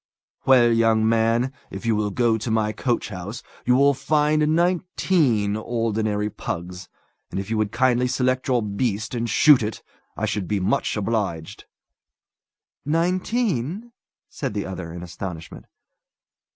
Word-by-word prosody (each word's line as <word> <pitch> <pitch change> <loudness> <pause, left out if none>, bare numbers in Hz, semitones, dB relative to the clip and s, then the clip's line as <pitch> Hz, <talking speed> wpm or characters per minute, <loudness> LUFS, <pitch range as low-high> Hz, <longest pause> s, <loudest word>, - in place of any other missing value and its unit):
"Well, 125 -3 +6
young 115 -1 +3
man, 115 +3 +2 0.2
if - - -8
you 115 -1 +2
will 105 0 0
go 115 +2 +2
to 110 +2 -4
my 110 -1 +1
coachhouse, 105 -4 -3 0.2
you 125 - +5
will 140 +2 +5
find 150 +2 +2
nineteen 170 - +1
ordinary 110 -2 -1
pugs; 90 -2 -6 0.4
and - - -4
if 100 +3 -5
you 110 - 0
would 105 -2 0
kindly 125 +1 +2
select 130 0 0
your 125 -4 +2
beast, 105 +1 -2
and 120 -1 -2
shoot 145 +4 +6
it, 110 0 -4 0.3
I - - -1
should 100 -4 -2
be 105 -2 0
much 110 +6 0
obliged." 100 -7 -3 1.2
"Nineteen?" 180 - -1 0.4
said - - -5
the 100 - -2
other, 95 -3 -6
in 85 +1 -7
astonishment. 85 -1 -8
115 Hz, 140 wpm, -23 LUFS, 105-130 Hz, 1.2 s, Well